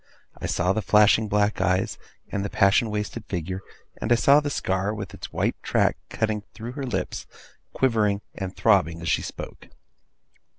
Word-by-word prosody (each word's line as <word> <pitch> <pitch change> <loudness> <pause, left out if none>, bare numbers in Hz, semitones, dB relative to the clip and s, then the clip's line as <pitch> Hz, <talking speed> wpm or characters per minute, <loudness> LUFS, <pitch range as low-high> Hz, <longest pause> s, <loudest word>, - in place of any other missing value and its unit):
I - - -5
saw 90 +2 +1
the 110 - -1
flashing 105 +1 +5
black 105 +1 +1
eyes, 90 +1 +1 0.3
and 100 - -1
the 100 - -2
passion 110 +1 +3
wasted 105 +2 -3
figure; 95 +1 -3 0.4
and 115 - -2
I - - +7
saw 140 +5 +6
the 145 -1 -2
scar, 95 -4 -1
with 100 -5 -6
its - - -8
white - - -1
track - - +2
cutting 110 -1 -1
through 115 +1 -6
her 135 +1 -5
lips, 125 - -3 0.5
quivering 105 -6 +2
and 95 0 -5
throbbing 85 -7 +3
as 80 - -1
she - - +2
spoke. - - -8
105 Hz, 170 wpm, -25 LUFS, 95-110 Hz, 0.5 s, I